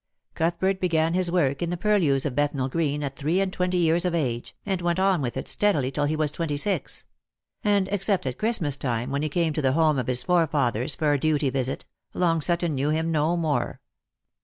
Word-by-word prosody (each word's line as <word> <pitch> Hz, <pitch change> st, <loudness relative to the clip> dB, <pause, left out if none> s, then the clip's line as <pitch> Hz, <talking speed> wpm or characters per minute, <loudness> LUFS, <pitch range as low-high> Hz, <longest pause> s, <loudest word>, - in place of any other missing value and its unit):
Cuthbert 175 Hz, +4 st, 0 dB
began 165 Hz, -2 st, +1 dB
his 180 Hz, -1 st, +2 dB
work 150 Hz, -6 st, +1 dB
in 170 Hz, -, -1 dB
the 175 Hz, -, -2 dB
purlieus 170 Hz, -9 st, +2 dB
of 145 Hz, -, -1 dB
Bethnal 145 Hz, -2 st, 0 dB
green 150 Hz, -1 st, -1 dB
at 135 Hz, -1 st, -4 dB
three 155 Hz, +7 st, 0 dB
and 195 Hz, -1 st, 0 dB
twenty 180 Hz, 0 st, 0 dB
years 170 Hz, 0 st, +2 dB
of 180 Hz, -2 st, 0 dB
age, 120 Hz, -7 st, -2 dB
and 190 Hz, -3 st, -1 dB
went 175 Hz, +1 st, 0 dB
on 190 Hz, -4 st, +2 dB
with 120 Hz, -3 st, -3 dB
it -, -, -4 dB
steadily 150 Hz, -11 st, +1 dB
till 145 Hz, +2 st, 0 dB
he 155 Hz, +2 st, 0 dB
was 155 Hz, -1 st, 0 dB
twenty 155 Hz, -3 st, -2 dB
six; 195 Hz, +7 st, -1 dB, 0.6 s
and, 205 Hz, -2 st, +2 dB
except 200 Hz, -3 st, 0 dB
at 130 Hz, -1 st, -4 dB
Christmas 180 Hz, -, 0 dB
time, 125 Hz, -1 st, -2 dB
when 140 Hz, +1 st, -1 dB
lie 155 Hz, -, -1 dB
came 165 Hz, 0 st, 0 dB
to 155 Hz, -, -1 dB
the 130 Hz, -2 st, +2 dB
home 155 Hz, -2 st, +3 dB
of 125 Hz, -, -3 dB
his 125 Hz, -1 st, 0 dB
forefathers 145 Hz, -7 st, +1 dB
for 150 Hz, -2 st, +1 dB
a 145 Hz, -, +1 dB
duty 150 Hz, -2 st, +1 dB
visit, 130 Hz, -1 st, -2 dB, 0.3 s
Long 165 Hz, -3 st, +2 dB
Sutton 170 Hz, 0 st, 0 dB
knew 140 Hz, +2 st, 0 dB
him 160 Hz, +2 st, 0 dB
no 160 Hz, +2 st, +1 dB
more. 160 Hz, -4 st, -1 dB
155 Hz, 215 wpm, -25 LUFS, 140-175 Hz, 0.6 s, home